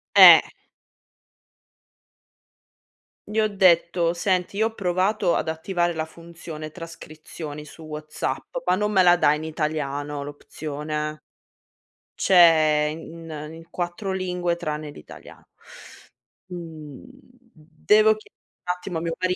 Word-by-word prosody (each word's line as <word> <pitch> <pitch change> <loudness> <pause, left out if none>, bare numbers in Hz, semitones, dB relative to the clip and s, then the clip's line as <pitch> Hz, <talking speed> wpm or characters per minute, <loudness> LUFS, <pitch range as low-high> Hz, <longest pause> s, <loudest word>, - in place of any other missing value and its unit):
Eh! - - +11 2.9
Gli 215 +1 -1
ho 215 - +3
detto: 175 -3 +3
"Senti, 185 +1 -1
io 220 +1 +3
ho 225 - -10
provato 185 0 +1
ad - - -1
attivare 175 +1 -1
la 160 - -2
funzione 165 -1 -9
trascrizioni 155 -2 -9
su 155 +2 -14
WhatsApp, 155 - -5
ma - - +4
non 210 +2 -1
me 190 - +4
la 175 -1 +6
dà 150 - +4
in 150 +1 -4
italiano 150 -2 -3
l'opzione." 150 +1 -5 0.9
"C'è 155 -4 +5
in 165 0 -10 0.2
in 165 +1 -13
4 175 +3 -4
lingue 180 -2 -1
tranne 155 -3 -4
l'italiano." 75 - -14 1.0
Mhmm, 160 -5 -9 0.5
devo 210 +8 +3
chie 215 - -17 0.3
attimo 180 -1 -3
a - - -7
mio 165 -1 -3
mari 185 0 0
165 Hz, 115 wpm, -24 LUFS, 155-180 Hz, 2.9 s, Eh